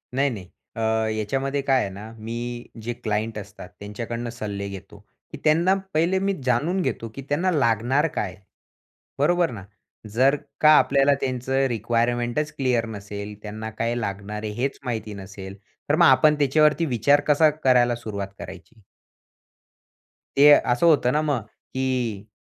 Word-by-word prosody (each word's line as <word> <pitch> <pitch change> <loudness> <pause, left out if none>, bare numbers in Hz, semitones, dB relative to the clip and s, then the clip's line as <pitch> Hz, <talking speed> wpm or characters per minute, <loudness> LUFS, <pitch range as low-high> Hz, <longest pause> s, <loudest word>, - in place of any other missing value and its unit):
नाही 140 +1 +2
नाही. 105 -7 -7 0.3
अ, - - -6 0.4
याच्यामध्ये 135 +6 -1
काय 135 -1 +2
आहे - - -2
ना, 105 +3 -9
मी 120 +2 -5 0.2
जे 120 +2 -3
क्लायंट 110 0 -3
असतात 100 -3 -9
त्यांच्याकडनं 115 +3 -5
सल्ले 105 -4 -5
घेतो, 100 -1 -10 0.3
की - - -7
त्यांना 170 +5 +4 0.2
पहिले 170 +4 +2
मी 195 +1 0
जाणून 150 +10 +1
घेतो 115 -8 -3
की 135 - -6
त्यांना 175 +6 +1
लागणार 130 - +2
काय? 95 -3 -2 0.8
बरोबर 175 +3 +3
ना? 110 -5 -8 0.5
जर 130 +5 +4 0.3
का 155 - +7
आपल्याला 140 +1 +4
त्यांचं 130 +1 0
रिक्वायरमेंटच 120 +5 -1
क्लिअर 125 -4 +1
नसेल, 100 -1 -7
त्यांना 110 +1 -6
काय 115 +1 0
लागणार 105 -1 -4
आहे 105 - -3
हेच 135 +1 -2
माहिती 110 -3 -3
नसेल, 95 0 -9 0.3
तर 145 - +4
मग 170 +1 +5
आपण 145 +4 +5
त्याच्यावरती 150 +3 +3
विचार 140 +2 +3
कसा 150 +1 +5
करायला 125 -5 +2
सुरुवात 105 -4 -5
करायची? 110 - -11 1.5
ते 145 +2 +7
असं 125 0 +4
होतं 135 -6 +4
ना 150 - +2
मग 145 -6 0 0.4
की 125 -6 -2
120 Hz, 145 wpm, -24 LUFS, 110-145 Hz, 1.5 s, का